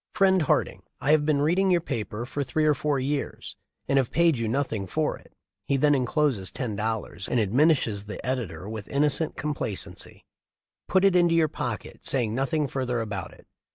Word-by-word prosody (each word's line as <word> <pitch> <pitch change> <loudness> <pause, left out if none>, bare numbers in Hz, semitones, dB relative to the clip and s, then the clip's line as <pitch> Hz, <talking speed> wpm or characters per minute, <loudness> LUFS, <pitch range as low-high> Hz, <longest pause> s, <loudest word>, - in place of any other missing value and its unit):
* - - -58
"Friend 190 -3 +4
Harding: 155 - +1 0.2
I 145 - +1
have 155 -1 +3
been 145 -2 +2
reading 185 +5 +2
your 180 -2 +4
paper 120 -7 -4
for 140 +3 -3
three 155 +4 0
or 150 - +5
four 145 0 0
years 140 +2 -3 0.3
and 140 - +2
have 130 -3 +2
paid 170 -2 +3
you 115 - -1
nothing 115 -5 -1
for - - 0
it." - - -21 0.4
He 140 - +2
then 145 +2 +4
encloses 130 - +1
ten 120 -2 -4
dollars 105 -4 -3
and 125 - +1
adminishes 110 - +2
the 105 - -6
editor 110 -9 -3
with 110 -2 -6
innocent 150 +2 +1
complacency: 145 -9 -5 0.6
"Put 190 +1 +3
it 195 -2 +4
into 175 -2 +4
your 160 -2 +3
pocket, - - -5
saying 120 -5 0
nothing 140 +4 0
further 130 -3 -2
about 105 -5 -4
it." - - -19
135 Hz, 190 wpm, -26 LUFS, 110-155 Hz, 0.6 s, or